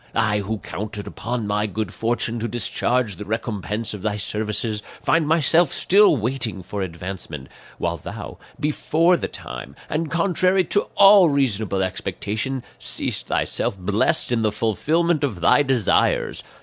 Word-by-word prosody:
I 105 -2 +2
who 105 +2 -3
counted 105 0 -6
upon 120 0 -4
my 105 +1 0
good 105 -2 -4
fortune 115 0 -1
to 115 - -2
discharge 120 -1 0
the 105 - -7
recompense 105 0 -3
of 105 - -7
thy 105 0 -1
services, 105 +1 -2 0.2
find 165 -2 +2
myself 160 0 +3
still 200 -4 +4
waiting 115 -4 -2
for 100 +3 -5
advancement, 85 -5 -6 0.3
while - - -2
thou, - - -8 0.2
before 160 +3 +2
the - - -2
time, 60 0 -8 0.2
and 155 +1 -1
contrary 185 +2 +2
to 200 +3 0
all 195 -3 +8
reasonable 110 -8 +1
expectation, 110 +7 -3 0.2
seest - - -4
thyself - - -1
blessed 100 +6 0
in 120 -2 +1
the 110 -1 +1
fulfillment 150 - +1
of 115 -11 -1
thy 90 +11 +5
desires. 130 -7 +1
110 Hz, 145 wpm, -22 LUFS, 105-145 Hz, 0.3 s, all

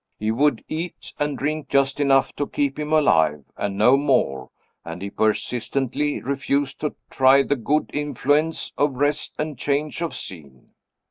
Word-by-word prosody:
He 110 +1 -1
would 135 +1 +2
eat 165 +2 -6
and 145 -1 -1
drink 150 0 -2
just 140 0 +2
enough 135 -2 +3
to 145 - -1
keep 140 0 -1
him 150 0 -3
alive, 80 - +3
and 100 -1 -3
no 125 +6 +5
more; 95 - +1 0.3
and 85 +1 -7
he 100 +1 -6
persistently 125 +6 -1
refused 140 0 -1
to 150 - -2 0.2
try 135 +1 +5
the 145 - 0
good 145 +5 0
influence 145 +2 0
of 145 -2 +2
rest 145 +3 -1
and 150 -4 -4
change 145 +4 -1
of 170 - -3
scene. 70 -8 -10
140 Hz, 155 wpm, -23 LUFS, 115-150 Hz, 0.3 s, no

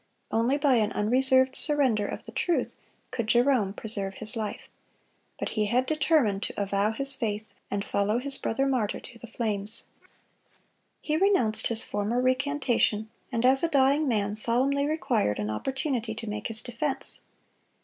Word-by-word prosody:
Only 235 +5 +2
by 280 -4 +3
an 215 -2 +1
unreserved 260 +4 +3
surrender 260 -9 +2
of - - -6
the - - -10
truth 345 - -1 0.4
could 235 -3 -3
Jerome 240 -3 +3
preserve 200 -2 -4
his 220 +2 -2
life. 215 -2 -4 0.7
But - - -3
he 210 -2 0
had 250 +4 +2
determined 290 -9 +2
to - - -4
avow 200 +1 +1
his 275 +4 +3
faith, 220 -4 -4 0.2
and 200 0 -2
follow 205 +3 0
his 275 +2 -1
brother 270 +4 0
martyr 250 -6 0
to 230 -2 -13
the 235 - -10
flames. 215 -1 -2 1.2
He 305 0 0
renounced 255 - +2
his 230 -1 +1
former 205 +4 -1
recantation, 255 -5 +1 0.2
and 230 0 0
as 265 +1 +4
a 335 - +2
dying 280 +1 +3
man, 205 -4 0
solemnly 260 +6 +2
required 250 - 0
an 105 0 -2
opportunity 255 - -2
to 225 0 -6
make 210 0 -3
his 225 0 -3
defense. 265 +3 -4
235 Hz, 160 wpm, -27 LUFS, 215-270 Hz, 1.2 s, as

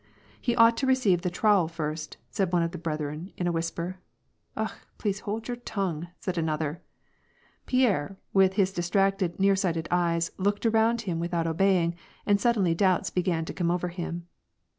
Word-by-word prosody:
'^ - - -37 0.4
He 240 -2 0
ought 230 -1 +6
to 265 - 0
receive 225 -10 +3
the 180 - -1
trowel 195 -1 +3
first/' 155 -1 -4 0.2
said 190 -3 0
one 175 -2 +3
of 165 - -1
the 175 - -7
breth 155 -2 -3
ren, 150 +6 -5
in 180 - -2
a 175 - +2
whisper. 170 +2 -3 0.3
" - - -32
Akh! - - -1 0.2
please 205 -2 -1
hold 215 +2 -4
your 245 -1 -3
tongue," 190 -9 -3
said 185 -2 -2
another. 155 -1 -2 0.9
Pierre, 200 - +2 0.2
with 190 -1 +5
his 190 -1 +2
distracted, 190 0 +1
nearsighted 190 -4 +2
eyes, 170 -1 +1
looked 205 +3 0
around 225 +1 +3
him 180 -6 -3
without 170 -1 -1
obeying, 170 0 +2 0.3
and 200 -1 +3
suddenly 205 -8 +3
doubts 185 +1 +2
began 175 -3 0
to - - -6
come 175 -2 0
over 180 0 0
him. 170 -1 -5
180 Hz, 180 wpm, -27 LUFS, 170-200 Hz, 0.9 s, ought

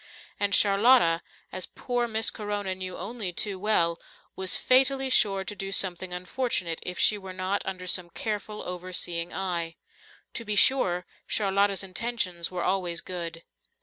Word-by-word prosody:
And 200 0 +3
Charlotta, 200 -4 +5 0.3
as 185 - -2
poor 245 -1 -2
Miss 220 0 +2
Corona 205 -2 -3
knew 185 -1 -6
only 200 0 -4
too 195 +2 -1
well, 170 -5 +1 0.4
was 190 -1 +1
fatally 265 +1 +4
sure 195 -5 +4
to 205 +2 -5
do 195 0 -5
something 185 -2 +1
unfortunate 180 -2 -2
if 180 -1 -4
she 210 - +4
were 190 -1 -8
not 185 +2 -1
under 185 -1 -5
some 180 -1 +2
careful, 210 +2 -4
overseeing 175 -1 -3
eye. 170 -3 -3 0.6
To 235 - -4
be 210 -2 -2
sure, 185 -7 +4 0.2
Charlotta's 200 -1 +1
intentions 185 -3 -2
were 180 -1 -4
always 180 -3 0
good. 170 -2 -6
190 Hz, 150 wpm, -27 LUFS, 180-210 Hz, 0.6 s, Charlotta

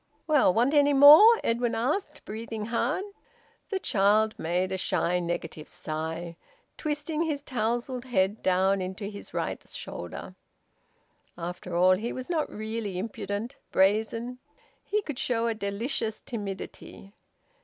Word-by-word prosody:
"Well, 295 - +4
want 240 +8 +2
any 290 -1 +5
more?" 305 +12 +9
Edwin 235 +1 0
asked, 295 - -2
breathing 220 0 -5
hard. 240 - 0 0.7
The 390 - -1
child 215 - +2
made 180 +3 -1
a - - 0
shy, 180 -1 0
negative 170 -3 -4
sigh, 160 +2 -5 0.4
twisting 300 +1 -2
his 300 -4 -1
tousled 240 0 -2
head 205 -4 +1
down 190 +1 +2
into 185 +2 -5
his 200 - -10
right - - -3
shoulder. - - -7 1.0
After 175 +1 -5
all 185 +1 +5
he 230 +4 -3
was 255 +6 -6
not 320 -3 0
really 215 -3 -4
impudent, 205 +3 -4
brazen. 220 +5 +1 0.4
He 420 0 -1
could 295 -7 -5
show 245 -6 0
a 230 - +1
delicious 220 +2 -2
timidity. 200 -2 -7
220 Hz, 130 wpm, -27 LUFS, 190-260 Hz, 1.0 s, more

